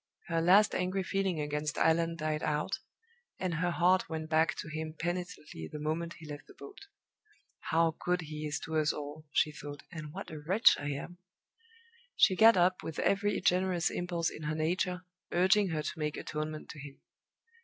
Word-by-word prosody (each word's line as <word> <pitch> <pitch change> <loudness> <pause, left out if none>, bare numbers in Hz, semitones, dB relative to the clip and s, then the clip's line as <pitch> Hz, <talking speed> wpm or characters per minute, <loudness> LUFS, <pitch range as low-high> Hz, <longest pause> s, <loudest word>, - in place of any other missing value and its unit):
Her 165 -1 +1
last 195 +5 +6
angry 185 +1 0
feeling 195 -3 -1
against 150 0 -2
Allan 165 +1 +3
died 155 -1 -2
out, 150 0 -1 0.6
and 185 -2 -2
her 170 +2 0
heart 180 +2 +3
went 160 -1 -5
back 160 +1 +3
to - - -6
him 155 0 -5
penitently 175 - -4
the - - -5
moment 160 +3 -2
he 165 - -12
left 145 -1 -8
the - - -15
boat. 400 0 -12 0.8
"How 165 -1 +3
good 180 0 +1
he 155 -1 -5
is 145 - -2
to 160 -1 -2
us 150 -1 +3
all!" 150 +1 -7
she 155 - +2
thought, 145 -1 -9
"and 155 -4 -7
what - - -7
a 155 - -6
wretch 185 +9 +5
I 145 - -3
am!" 175 +5 -7 1.0
She 195 -4 +5
got 225 +1 +7
up 180 +1 +3
with 160 - -6
every 205 +1 +1
generous 180 -1 +2
impulse 175 -1 -1
in - - -9
her 150 0 -2
nature 180 +3 -1 0.3
urging 190 +3 +4
her 155 -2 -2
to 155 - -5
make 150 -1 -2
atonement 155 0 -5
to 150 - -9
him. 145 -1 -10
165 Hz, 185 wpm, -31 LUFS, 150-180 Hz, 1.0 s, got